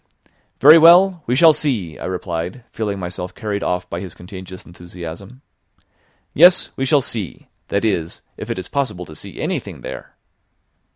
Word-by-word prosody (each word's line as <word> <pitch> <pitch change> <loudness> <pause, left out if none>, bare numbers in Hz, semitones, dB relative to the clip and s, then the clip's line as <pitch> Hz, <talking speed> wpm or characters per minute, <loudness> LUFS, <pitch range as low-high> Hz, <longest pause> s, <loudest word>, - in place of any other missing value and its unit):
"Very 155 +4 +9
well, 175 +2 +6
we 125 - +1
shall 160 +3 +7
see," 115 - -3
I - - -6
replied, 90 +4 -4
feeling 105 -3 -3
myself 90 0 -6
carried 105 -2 -3
off 90 0 -2
by 85 - -5
his 90 -3 -8
contagious 95 0 -10
enthusiasm. 90 - -10 0.9
"Yes, 175 +4 +5
we 135 - -2
shall 145 0 +4
see; 110 -7 -6 0.2
that 100 +2 -1
is, 85 -6 -2
if - - -8
it - - -3
is 95 - -6
possible 115 -11 -3
to 80 - -12
see - - -10
anything - - -4
there." - - -9
100 Hz, 160 wpm, -19 LUFS, 90-135 Hz, 0.9 s, Very